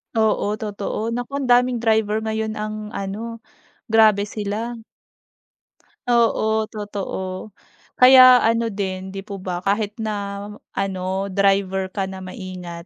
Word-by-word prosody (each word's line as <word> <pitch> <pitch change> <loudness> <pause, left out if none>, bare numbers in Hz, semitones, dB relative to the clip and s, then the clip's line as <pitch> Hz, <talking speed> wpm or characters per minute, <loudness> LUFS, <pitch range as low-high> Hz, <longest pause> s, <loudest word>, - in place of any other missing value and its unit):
Oo 215 -1 +1
totoo, 210 +1 -4
naku 245 +2 -4
ang 280 -2 -2
daming 245 0 +4
driver 220 -1 +2
ngayon 220 0 -2
ang 215 0 -4 0.2
ano, 220 +4 -5 0.5
grabe 215 -2 +5
sila. 215 +3 -4 1.3
Oo 220 -2 +2
totoo. 200 -2 -5 0.5
Kaya 255 0 +9
ano 230 0 +2
din, 190 -2 -4
'di 195 0 -7
po 200 -2 -7
ba 180 -1 -3
kahit 205 +1 0
na 220 -1 -2 0.6
ano, 190 0 -2
driver 195 -1 +1
ka 195 0 -2
na 190 0 -7
maingat, 185 -2 -8
210 Hz, 120 wpm, -22 LUFS, 195-225 Hz, 1.3 s, Kaya